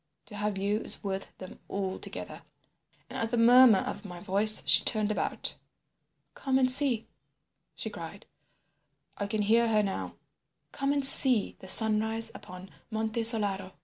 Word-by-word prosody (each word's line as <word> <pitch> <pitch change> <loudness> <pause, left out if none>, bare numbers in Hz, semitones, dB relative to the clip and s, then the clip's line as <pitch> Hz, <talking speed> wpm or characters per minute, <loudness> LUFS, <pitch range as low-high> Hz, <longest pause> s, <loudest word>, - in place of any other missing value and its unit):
to 210 - -14
have 210 -1 -5
you 200 +2 -3
is - - -1
worth 195 -1 -8
them 185 - -14
all 190 -1 -7
together.' - - -9 0.7
And - - -10
at 225 - -4
the 240 - -4
murmur 240 -1 +4
of 205 - -8
my 175 -4 -12
voice 205 +4 +2
she - - +3
turned 215 -1 0
about. - - -5 0.8
"'Come 265 -1 -4
and 255 -1 +2
see,' 255 -4 +2 0.7
she - - -8
cried—I 200 - -15
can 215 0 -4
hear 230 +3 0
her 215 -2 -1
now—'come 275 +6 -9
and 285 -1 +3
see 255 -5 +6
the 190 - -15
sunrise 220 +2 +1
upon 185 +1 -14 0.2
Monte 220 +1 -5
Solaro. 200 -5 +3
215 Hz, 145 wpm, -26 LUFS, 200-230 Hz, 0.8 s, see